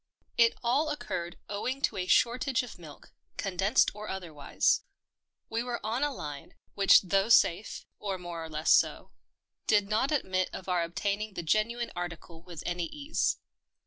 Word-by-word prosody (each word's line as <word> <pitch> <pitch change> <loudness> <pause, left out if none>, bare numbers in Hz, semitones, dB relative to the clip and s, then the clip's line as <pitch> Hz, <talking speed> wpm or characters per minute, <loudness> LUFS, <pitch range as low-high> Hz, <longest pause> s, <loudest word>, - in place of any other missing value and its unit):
It 230 -1 +4
all 275 +7 +2
occurred 175 -12 -4
owing 230 +6 -3
to - - +1
a 185 -2 -2
shortage 250 +4 +3
of 245 - -10
milk 155 -4 -13
— - - -44
condensed 195 +1 +2
or 210 +1 -8
otherwise. 170 -7 0 0.7
We 225 +1 -2
were 245 0 -3
on 230 +4 -1
a 290 0 +1
line, 150 - -7 0.2
which 200 0 +6
though 195 +3 +1
safe 210 -3 +3
— - - -53
or 195 -2 -3
more 175 -2 -6
or 160 - -7
less 155 +1 0
so - - +3 0.3
— - - -51
did 205 -2 +4
not 225 +7 +1
admit 185 -11 0
of 190 - -7
our 180 -2 +1
obtaining 200 +5 -2
the 175 - -4
genuine 230 +7 0
article 170 -1 -6
with 170 -2 -9
any 175 -1 -1
ease. 295 - -1
200 Hz, 175 wpm, -30 LUFS, 175-235 Hz, 0.7 s, which